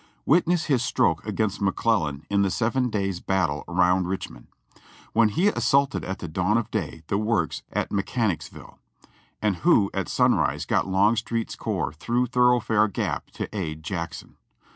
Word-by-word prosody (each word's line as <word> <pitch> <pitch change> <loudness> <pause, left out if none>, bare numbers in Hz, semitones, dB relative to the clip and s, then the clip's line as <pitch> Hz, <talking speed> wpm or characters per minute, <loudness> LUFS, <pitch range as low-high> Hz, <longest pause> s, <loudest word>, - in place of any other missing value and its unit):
Witness 170 +2 +3
his 135 -5 +2
stroke - - +1
against 105 -3 -1
McClellan 90 -7 0
in 100 0 +1
the 100 - +2
Seven 125 +5 0
Days' 95 -4 -2
Battles 85 -7 -1
around 90 +1 +2
Richmond, 90 -10 -6 0.7
when 110 -1 +4
he 175 - +2
assaulted 140 -7 +1
at 95 - -4
the 85 - -6
dawn 90 +7 +1
of 115 0 -3
day 85 -6 -4
the 100 - -1
works 105 -7 0
at - - -2
Alechanicsville; 100 -1 -3 0.6
and 105 -4 +1
who 115 - +3
at - - -2
sunrise - - +2
got - - +1
Longstreet's 110 +4 +1
corps - - -2
through 120 +11 0
Thoroughfare 125 -3 +3
Gap 100 - -3
to - - -6
aid 80 -5 -4
Jackson. 85 -5 -6
100 Hz, 150 wpm, -25 LUFS, 90-115 Hz, 0.7 s, when